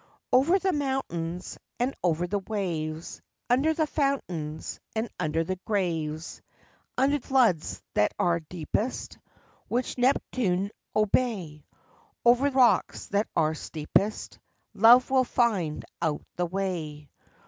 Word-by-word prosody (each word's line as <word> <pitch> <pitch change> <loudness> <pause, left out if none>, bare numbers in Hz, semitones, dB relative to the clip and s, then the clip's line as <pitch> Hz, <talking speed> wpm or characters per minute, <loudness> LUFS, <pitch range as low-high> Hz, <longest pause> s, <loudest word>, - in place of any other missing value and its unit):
Over 285 +9 +5
the 385 -1 0
mountains 180 - -3 0.2
And 250 +3 +1
over 175 -1 +1
the 200 +3 -1
waves, 170 -6 -4 0.3
Under 275 +6 +4
the 315 - +2
fountains 185 - -2 0.2
And 220 +2 0
under 155 +2 0
the 185 +3 -3
graves; 165 -6 -2 0.6
Under 280 +3 +3
floods 240 - +1
that 105 - +3
are 170 -1 +2
deepest, 175 - -4 0.5
Which 250 +1 -2
Neptune 210 -7 +1 0.2
obey; 200 - 0 0.6
Over 245 +4 +5
rocks 260 -3 +3
that 205 +2 +1
are 155 -1 +2
steepest, 160 +7 -2 0.3
Love 240 +5 +6
will 260 -1 +5
find 210 -11 0 0.2
out 155 -3 -1
the 175 0 -1
way. 165 -6 -4
195 Hz, 115 wpm, -27 LUFS, 165-255 Hz, 0.6 s, Love